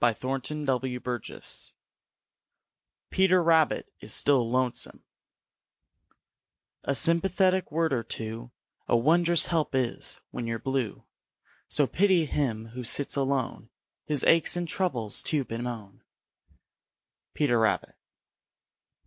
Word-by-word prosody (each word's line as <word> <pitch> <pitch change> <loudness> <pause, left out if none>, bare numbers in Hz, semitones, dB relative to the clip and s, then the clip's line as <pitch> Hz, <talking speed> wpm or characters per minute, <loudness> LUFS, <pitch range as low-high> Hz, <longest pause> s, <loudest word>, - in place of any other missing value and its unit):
CHAPTER 130 +5 -1
VI 125 -2 -3 1.7
PETER 185 -1 +4
RABBIT 160 -2 +2
IS - - -3
STILL 130 -5 +3
LONESOME 125 -1 -1 1.8
A 140 - 0
sympathetic 185 +3 +2
word 160 -1 +1
or 120 - +1
two 115 +1 -4 0.4
A 120 - +3
wond'rous 170 +6 +3
help 160 -5 0
is, 125 -3 0
when 120 - -5
you're 115 0 -2
blue. 130 -3 -3 0.7
So 145 - +3
pity 185 +2 +2
him 115 -7 -2
who 125 +2 -7
sits 140 +4 0
alone 135 -4 -2 0.3
His 150 -3 +1
aches 165 +1 +4
and 175 -1 -2
troubles 130 - -1
to 145 -4 -1
bemoan. 115 -4 -6 1.3
Peter 125 -6 +2
Rabbit. 110 - 0
135 Hz, 105 wpm, -27 LUFS, 120-165 Hz, 1.8 s, PETER